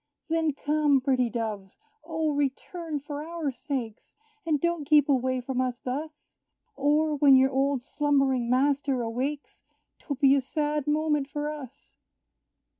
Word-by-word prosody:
Then 320 -2 +1
come, 295 -1 +2
pretty 255 -2 +1
Doves! 215 -5 -5 0.3
O, 320 -1 -1
return 290 +3 -3
for 290 +1 -6
our 325 -3 -3
sakes, 245 -3 -6 0.3
And 305 -3 +2
don't 340 -1 0
keep 295 0 +4
away 260 -2 +1
from 255 +1 -2
us 250 -1 -2
thus; 295 +5 -7 0.4
Or, 295 +2 +1
when 275 -1 +6
your 265 +1 +4
old 270 -1 0
slumbering 275 -4 +1
master 270 0 +1
awakes, 260 +6 -4 0.4
'Twill 285 - -4
be 275 -2 +6
a 280 - +3
sad 295 +1 -2
moment 300 -2 +1
for 295 +1 -3
us! 280 -3 -11
285 Hz, 140 wpm, -27 LUFS, 260-300 Hz, 0.4 s, when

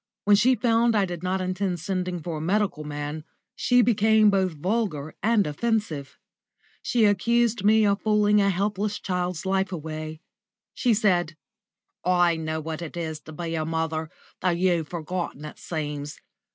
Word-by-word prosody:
When 205 0 +6
she 250 +6 +4
found 235 -1 +2
I 205 -2 +3
did 175 -2 -6
not 185 +1 -1
intend 185 -1 -2
sending 180 +1 -2
for 165 -1 -4
a - - -6
medical 185 -2 0
man, 150 +1 -5 0.3
she 245 0 +3
became 220 -1 +4
both 190 -3 +1
vulgar 160 -3 -2
and 215 0 +3
offensive. 155 -4 -2 0.6
She 235 -3 +2
accused 230 +2 +2
me 215 +1 +5
of 200 0 +1
fooling 210 -1 +3
a 200 - +3
helpless 205 +2 -1
child's 180 -1 -3
life 190 0 0
away. 155 -2 -6 0.5
She 240 -4 +2
said: 180 -7 +1 0.7
"I 175 -1 +3
know 160 0 -3
what 160 +1 -5
it 170 0 -7
is 160 -2 -4
to 155 - -12
be 165 +1 -5
a 160 -1 -1
mother, 160 0 -2 0.3
though 185 - +1
you've 175 -2 +1
forgotten, 170 -2 -4
it 150 - -10
seems. 150 -3 -5
180 Hz, 160 wpm, -25 LUFS, 160-210 Hz, 0.7 s, When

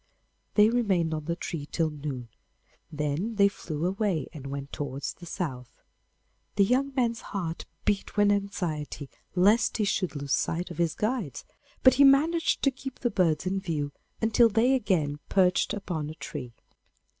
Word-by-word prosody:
They 210 +1 +6
remained 190 -9 +1
on 155 -1 -4
the 170 - -1
tree 155 -4 -5
till 160 -2 +1
noon; 140 -5 -6 0.6
then 150 +9 -2
they 200 -1 +6
flew 165 -5 -4
away 195 -3 0
and 140 -4 -8
went 140 0 -5
towards 140 -1 -4
the 175 - -12
south. 130 -8 -5 0.8
The 200 - +5
young 260 +6 +2
man's 235 -3 +1
heart 170 -5 -4 0.2
beat 205 0 -1
with 205 0 +5
anxiety 170 -8 -3 0.2
lest 205 +6 +4
he 215 - +1
should 190 -4 0
lose 140 -1 -2
sight 175 +2 -1
of 170 - -8
his 165 -2 +1
guides, 215 - -2 0.4
but 260 - +8
he - - +10
managed 305 +5 +4
to 275 - +4
keep 265 0 -8
the 240 - -1
birds 170 -5 +2
in 190 +1 0
view 155 -6 -2 0.3
until 225 +1 +5
they 230 +5 +3
again 170 - +1
perched 180 -2 +3
upon 165 -7 -3
a 155 - -7
tree. 125 -6 -7
180 Hz, 165 wpm, -28 LUFS, 150-215 Hz, 0.8 s, he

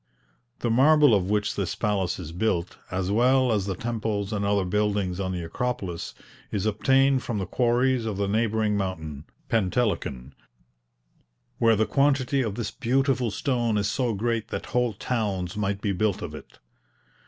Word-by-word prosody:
The 120 - 0
marble 145 +2 +6
of 95 -2 +2
which 105 0 0
this 100 -4 -2
palace 100 -4 0
is 85 -4 -7
built, 90 -1 -1
as 95 +1 -2
well 125 +3 +3
as 100 -3 0
the 95 - -2
temples 110 -1 -2
and 100 -1 -1
other 100 -1 +1
buildings 100 -1 0
on 95 -1 -2
the 90 -2 -3
Acropolis, 85 - -4 0.4
is 100 -1 -1
obtained 135 +5 +3
from 115 -4 -3
the 95 - -2
quarries 120 +3 +1
of 105 -3 -3
the 100 0 0
neighbouring 110 0 +1
mountain, 80 -7 -4 0.2
Pentelikon, 95 - -1 1.3
where 115 -1 +5
the 110 +1 +2
quantity 140 0 +2
of 110 -5 -2
this 105 -3 -3
beautiful 130 0 +1
stone 120 0 0
is 100 0 +1
so 125 -5 0
great 115 +1 -1
that - - -5
whole 125 -2 +2
towns 100 -5 -2
might 100 -1 -1
be 105 - 0
built 100 0 0
of 80 -3 -6
it. 75 - -11
105 Hz, 165 wpm, -26 LUFS, 95-120 Hz, 1.3 s, marble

